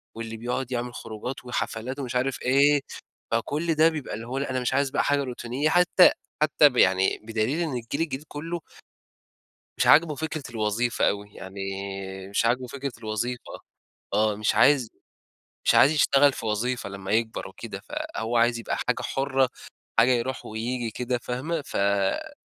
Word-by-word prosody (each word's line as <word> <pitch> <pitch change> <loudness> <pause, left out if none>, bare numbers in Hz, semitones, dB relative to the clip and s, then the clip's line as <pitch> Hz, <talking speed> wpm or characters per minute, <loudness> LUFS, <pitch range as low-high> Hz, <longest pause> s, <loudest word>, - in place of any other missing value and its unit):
واللي 115 0 -6
بيقعد 125 +2 -3
يعمل 120 0 -3
خروجات 120 +4 -7
وحفلات، 125 +2 -3
ومش 125 -2 -4
عارف 130 +1 0
إيه، 140 +2 +4 0.5
فكل 150 +8 0
ده 155 +1 +5
بيبقى 155 -8 -4
اللي 115 +2 -6
هو 130 +2 -3
لأ 140 - -2
أنا 130 -1 -1
مش 125 - -1
عايز 140 0 +2
بقى - - +1
حاجة 145 0 +2
روتينية 125 +3 -2
حتى 180 +2 +6 0.3
حتى 150 -1 +5
يعني 95 0 +3
بدليل 115 +8 -1
إن 160 - -2
الجيل 120 +5 -4
الجديد 150 -3 -2
كلُّه 165 +3 -5 1.2
مش - - +1
عاجبُه 155 0 +6
فكرة 155 0 -4
الوظيفة 115 +1 +1
أوي، 100 0 -3
يعني 95 +1 -9 0.7
مش 100 +3 +1
عاجبُه 125 +2 +1
فكرة 140 +1 -5
الوظيفة، 115 +2 -4 0.6
آه 105 -1 +2
مش 105 +1 0
عايز 135 -6 +5 0.8
مش - - +4
عايز 145 - +7
يشتغل 140 -1 +4
في 115 - -6
وظيفة 115 +2 -1
لمّا 95 -1 -7
يكبر 110 +1 0
وكده، - - -8
فهو 115 +2 -4
عايز 120 0 +3
يبقى 115 - -3
حاجة - - -1
حُرّة، 135 -1 +1 0.5
حاجة 120 +3 +6
يروح 125 +1 -1
وييجي 115 +1 -3
كده، 125 +2 -2
فاهمة 130 +7 -3
ف 100 -1 0
125 Hz, 160 wpm, -26 LUFS, 115-140 Hz, 1.2 s, عايز